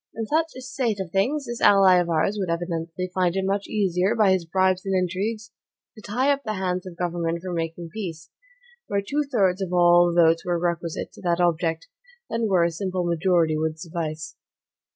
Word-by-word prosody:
In 225 - -3
such 320 +6 0
a - - -7
state 250 -4 -2
of 185 -3 -5
things, 260 - 0
this 240 0 -6
ally 195 -2 +6
of 175 -1 +1
ours 165 +5 +1
would 190 -3 -2
evidently 170 +1 -3
find 180 -1 +1
it 190 0 0
much 195 +1 -1
easier, 195 0 +1
by 210 -4 +4
his 185 -2 +1
bribes 185 +1 +1
and 195 -1 -1
intrigues, 200 +5 -2 0.4
to 215 - -12
tie 250 +8 +1
up 280 0 0
the 215 -1 -3
hands 185 -1 -2
of 175 -2 -10
government 170 -1 -2
from 185 -1 -4
making 165 0 -4
peace, 165 -6 -6 0.6
where 200 0 -1
two 295 +1 0
thirds 195 -6 +2
of 185 -2 -3
all 175 0 +5
the 170 - +1
votes 165 0 +3
were 175 -1 0
requisite 170 -1 -3
to - - -14
that 175 -1 0
object, 165 -2 0 0.4
than 230 -1 0
where 180 -3 +3
a 170 - +1
simple 185 +1 -3
majority 170 -2 +2
would 155 0 -2
suffice. 160 -2 -5
180 Hz, 200 wpm, -24 LUFS, 170-200 Hz, 0.6 s, ally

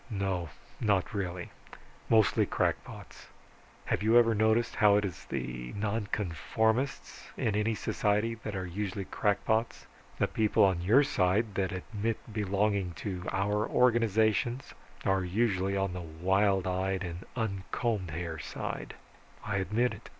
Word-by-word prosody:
"No, 95 -6 -2 0.3
not 105 -1 +1
really. 90 -3 -4 0.6
Mostly 110 -2 +4
crackpots. - - -3 0.6
Have - - 0
you 110 +3 +5
ever 115 -1 +5
noticed 110 +2 +2
how 105 -2 +6
it 105 0 +2
is 90 -5 -6
that - - -5
the 60 -1 -4
nonconformists 110 - -1
in 110 -6 0
any 110 +1 +1
society 105 +2 0
are 95 -3 -3
usually 100 +2 -4
crackpots? 110 +3 0 0.3
The - - +2
people 110 -1 +2
on 95 -3 +3
your 115 +11 +5
side 105 -4 +1
that 95 -1 -1
admit 105 +4 -3 0.2
belonging 100 -2 0
to 90 -1 -5
our 105 +2 0
organizations, 115 0 +2 0.3
are 95 -1 +2
usually 100 0 0
on 95 -2 0
the 90 - -5
wild 95 +4 +1
eyed 95 +1 -1
and 85 0 -6
uncombed 105 -2 -2
hair 80 0 -4
side - - -5 0.5
I 105 -2 -1
admit 105 +6 +1
it. - - -12
100 Hz, 135 wpm, -30 LUFS, 95-110 Hz, 0.6 s, how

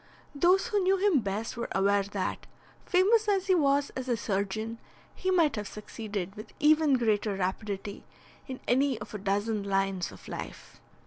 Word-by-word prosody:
Those 360 +9 +3
who 420 -3 +2
knew 380 +1 +3
him 380 -6 +3
best 210 +1 -3
were 235 - -3
aware 200 +1 +3
that, 200 -1 -4 0.4
famous 420 +4 +4
as 390 -2 +2
he 380 - +3
was 285 -4 +2
as 260 0 -5
a 240 - +1
surgeon, 215 +3 -2 0.3
he 375 - -3
might 335 -8 +3
have 210 -2 -4
succeeded 205 -3 -6
with 215 +1 -11
even 305 -1 +5
greater 215 -3 +1
rapidity 195 +1 -3 0.4
in 260 -2 -7
any 265 0 +2
of 210 - -9
a 210 - -4
dozen 205 +2 0
lines 195 -2 -1
of - - -14
life. - - -8
225 Hz, 170 wpm, -29 LUFS, 200-310 Hz, 0.4 s, even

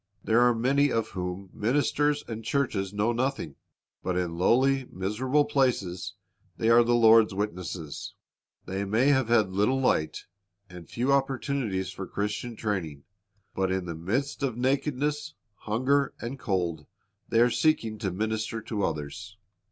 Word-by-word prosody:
There 115 +2 +3
are 120 -1 +4
many 140 +4 +2
of 115 -1 0
whom 90 +1 -5
ministers 145 +5 +1
and 115 -1 -6
churches 110 -7 -1
know 105 +3 +1
nothing. 120 - -2 0.5
But 90 -1 -2
in 90 -2 -2
lowly, 130 +9 +3
miserable 125 +10 0
places 125 - 0 0.4
they 115 - +2
are 120 +1 +7
the 120 +1 +2
Lord's 115 -3 +6
witnesses. 90 -6 -5 0.5
They 95 +1 -3
may 110 +8 +2
have 130 -4 +3
had 110 -5 +3
little 105 +8 +2
light, 80 -12 0 0.4
and 90 -3 -12
few 125 +4 +1
opportunities 135 -8 -1
for 95 0 -7
Christian 105 +3 -3
training; 85 -11 -3 0.5
but 95 -1 0
in 95 -1 -1
the 85 - -4
midst 115 - -2
of 130 -4 -1
nakedness, 145 +3 -1 0.2
hunger, 130 +8 0
and 125 +3 -6
cold 85 -8 -2 0.4
they 115 - +3
arc 120 0 +4
seeking 115 -9 +1
to 100 - -1
minister 110 +3 -2
to 105 -2 -3
others. 85 +6 -4
110 Hz, 145 wpm, -27 LUFS, 95-130 Hz, 0.5 s, are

